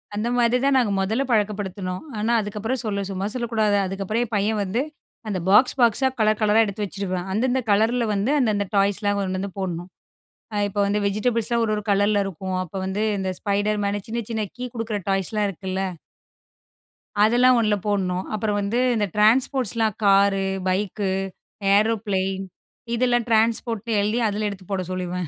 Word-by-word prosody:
அந்த 215 Hz, +3 st, -1 dB
மாதிரி 240 Hz, 0 st, +3 dB
தான் 275 Hz, 0 st, +3 dB
நாங்க 240 Hz, -5 st, +2 dB
மொதல்ல 220 Hz, +7 st, 0 dB
பழக்கப்படுத்துனோம். 200 Hz, -4 st, -1 dB, 0.2 s
ஆனா, 220 Hz, +3 st, 0 dB
அதுக்கப்புறம் 215 Hz, +5 st, -3 dB
சொல்ல 200 Hz, -2 st, -1 dB
சும்மா 195 Hz, 0 st, -3 dB
சொல்லக்கூடாது. 220 Hz, -4 st, +1 dB
அதுக்கப்புறம் 195 Hz, +5 st, -2 dB
என் 225 Hz, -, -12 dB
பையன் 210 Hz, +2 st, 0 dB
வந்து 195 Hz, +6 st, -1 dB, 0.5 s
அந்த 200 Hz, -3 st, -2 dB
பாக்ஸ் 235 Hz, +7 st, +5 dB
பாக்ஸா 240 Hz, +2 st, +4 dB
கலர் 215 Hz, -1 st, +2 dB
கலரா 215 Hz, +1 st, +4 dB
எடுத்து 205 Hz, +1 st, -4 dB
வச்சுருவான். 185 Hz, -2 st, -4 dB
அந்தந்த 250 Hz, +5 st, +1 dB
கலர்ல 225 Hz, +4 st, +3 dB
வந்து, 205 Hz, +7 st, 0 dB
அந்த 245 Hz, -5 st, +2 dB
அந்த 200 Hz, 0 st, 0 dB
டாய்ஸ்லாம் 205 Hz, +1 st, +2 dB
கொண்டு 190 Hz, -1 st, -2 dB
வந்து 195 Hz, +1 st, -4 dB
போடணும். 175 Hz, -1 st, -4 dB, 0.7 s
அ -, -, -2 dB
இப்போ 205 Hz, +1 st, -2 dB
வந்து 205 Hz, +1 st, 0 dB
வெஜிடபிள்ஸ்லாம் 230 Hz, +3 st, 0 dB
ஒரு 215 Hz, -, 0 dB
ஒரு 210 Hz, -, -3 dB
கலர்ல 205 Hz, +1 st, +3 dB
இருக்கும். 190 Hz, 0 st, -4 dB
அப்ப 180 Hz, +2 st, -16 dB
வந்து 195 Hz, +3 st, -2 dB, 0.2 s
இந்த 190 Hz, -1 st, -2 dB
spiderman, 205 Hz, 0 st, 0 dB
சின்ன 235 Hz, +2 st, -2 dB
சின்ன 220 Hz, -2 st, -1 dB
கீ 250 Hz, -, -5 dB
குடுக்குற 225 Hz, -2 st, -2 dB
டாய்ஸ்லாம் 195 Hz, +2 st, 0 dB
இருக்குல்ல 190 Hz, 0 st, -4 dB, 1.4 s
அதெல்லாம் 245 Hz, +3 st, +5 dB
ஒண்ணுல 215 Hz, -2 st, +2 dB
போடணும். 185 Hz, -3 st, 0 dB
அப்புறம் 210 Hz, -1 st, -1 dB
வந்து 200 Hz, +4 st, -1 dB, 0.2 s
இந்த 210 Hz, -2 st, +1 dB
ட்ரான்ஸ்போர்ட்ஸ்லாம் 225 Hz, -1 st, +2 dB
காரு, 195 Hz, 0 st, +4 dB, 0.2 s
பைக்கு, 195 Hz, +1 st, -1 dB, 0.6 s
ஏரோப்ளேன் 200 Hz, -3 st, 0 dB, 0.5 s
இதெல்லாம் 240 Hz, -1 st, +1 dB
ட்ரான்ஸ்போர்ட்ன்னு 225 Hz, 0 st, +1 dB
எழுதி 210 Hz, +4 st, 0 dB
அதில 210 Hz, +1 st, -1 dB
எடுத்து 195 Hz, -2 st, -9 dB
போட 195 Hz, -1 st, 0 dB
சொல்லிருவேன். 180 Hz, -1 st, -3 dB
210 Hz, 155 wpm, -23 LUFS, 195-225 Hz, 1.4 s, பாக்ஸ்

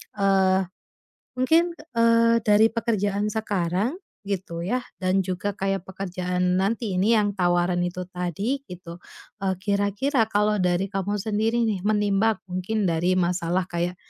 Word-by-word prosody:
eee, 190 Hz, -2 st, +2 dB, 0.6 s
mungkin, 325 Hz, +7 st, +2 dB, 0.2 s
eee, 230 Hz, 0 st, +4 dB
dari 215 Hz, +2 st, +5 dB
pekerjaan 210 Hz, -3 st, -1 dB
sekarang, 210 Hz, -, -1 dB, 0.3 s
gitu 180 Hz, -4 st, -3 dB
ya, 245 Hz, +9 st, -1 dB, 0.2 s
dan 185 Hz, +1 st, +2 dB
juga 185 Hz, +2 st, -3 dB
kayak 195 Hz, -1 st, -2 dB
pekerjaan 180 Hz, -1 st, -1 dB
nanti 220 Hz, +2 st, -1 dB
ini 220 Hz, +5 st, +4 dB
yang 205 Hz, -1 st, +2 dB
tawaran 175 Hz, -1 st, +1 dB
itu 180 Hz, +1 st, -3 dB
tadi 180 Hz, -, -2 dB
gitu, 175 Hz, -1 st, -10 dB, 0.4 s
eee, 190 Hz, -1 st, 0 dB
kira-kira 205 Hz, +6 st, 0 dB
kalau 210 Hz, 0 st, +1 dB
dari 180 Hz, +1 st, +1 dB
kamu 195 Hz, +1 st, -2 dB
sendiri 220 Hz, +3 st, 0 dB
nih, 210 Hz, -4 st, -1 dB
menimbang 210 Hz, 0 st, +2 dB
mungkin 190 Hz, +4 st, -2 dB
dari 175 Hz, +1 st, +1 dB
masalah 180 Hz, 0 st, 0 dB
kayak 175 Hz, +1 st, -2 dB
195 Hz, 130 wpm, -24 LUFS, 180-215 Hz, 0.6 s, dari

